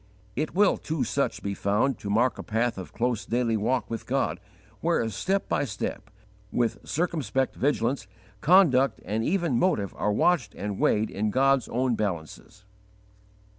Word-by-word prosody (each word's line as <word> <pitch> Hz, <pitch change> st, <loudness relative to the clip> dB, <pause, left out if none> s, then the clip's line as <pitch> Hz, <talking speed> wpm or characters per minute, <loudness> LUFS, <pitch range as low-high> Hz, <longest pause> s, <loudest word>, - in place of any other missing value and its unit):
It 155 Hz, +5 st, -2 dB
will 205 Hz, 0 st, +4 dB
to 155 Hz, -4 st, -2 dB
such -, -, -1 dB
be 100 Hz, -, -2 dB
found 105 Hz, +6 st, 0 dB
to 100 Hz, -, -6 dB
mark 120 Hz, +5 st, +2 dB
a -, -, -5 dB
path 115 Hz, -1 st, -1 dB
of 95 Hz, -, -8 dB
close 120 Hz, -2 st, -1 dB
daily 120 Hz, -1 st, 0 dB
walk 125 Hz, +5 st, 0 dB
with 115 Hz, -, -6 dB
God, -, -, 0 dB, 0.4 s
where, 115 Hz, -, +1 dB
step 195 Hz, -, -1 dB
by -, -, +1 dB
step, 105 Hz, -3 st, -4 dB, 0.4 s
with 120 Hz, -2 st, 0 dB
circumspect 135 Hz, -, -1 dB
vigilance, 135 Hz, -4 st, 0 dB, 0.3 s
conduct 135 Hz, -, +4 dB
and 110 Hz, +2 st, -1 dB
even 165 Hz, -6 st, +1 dB
motive 105 Hz, -, +1 dB
are 105 Hz, -, 0 dB
watched 175 Hz, +10 st, +2 dB
and 100 Hz, -1 st, -4 dB
weighed 110 Hz, +1 st, +2 dB
in 105 Hz, +2 st, -1 dB
God's 135 Hz, +1 st, +2 dB
own 125 Hz, +1 st, +1 dB
balances. 100 Hz, +1 st, -4 dB
120 Hz, 155 wpm, -27 LUFS, 105-140 Hz, 0.4 s, will